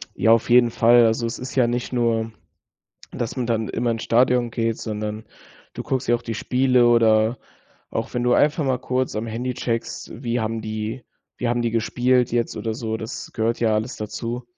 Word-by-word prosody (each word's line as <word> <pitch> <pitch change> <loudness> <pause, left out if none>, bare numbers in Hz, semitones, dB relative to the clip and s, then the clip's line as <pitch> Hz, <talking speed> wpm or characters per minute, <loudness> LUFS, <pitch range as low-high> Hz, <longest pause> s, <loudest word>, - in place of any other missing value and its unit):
Ja, 110 - +4
auf 115 +1 +2
jeden 120 -1 +6
Fall. 120 +1 +5
Also, 115 +1 0
es 115 - -4
ist 125 +1 -7
ja 130 -3 +4
nicht 120 +1 -3
nur, 115 -2 0 0.8
dass 120 +1 -4
man 125 - -2
dann 115 -2 -1
immer 120 0 -1
ins 115 -1 -3
Stadion 125 0 +2
geht, 115 -1 -1
sondern 105 0 -5 0.5
du - - -6
guckst 130 0 -2
ja 120 - +4
auch 120 - -6
die 115 - -5
Spiele 125 0 +3
oder 115 0 +4 0.5
auch - - -4
wenn 120 0 -1
du 125 - +3
einfach 150 +5 +3
mal 130 -2 0
kurz 130 0 -2
am 110 +2 -3
Handy 120 +3 -3
checkst, 120 -2 -4
wie 120 -1 -1
haben 110 0 -2
die 110 +3 -4 0.3
wie 125 - -2
haben 120 0 0
die 115 -1 -1
gespielt 125 +2 +1
jetzt 120 0 -1
oder 110 -1 -3
so? 110 -2 -3
Das 110 +4 -7
gehört 115 +1 -1
ja 110 -2 +2
alles 110 +4 -2
dazu. 115 +3 -5
115 Hz, 200 wpm, -22 LUFS, 110-125 Hz, 0.8 s, jeden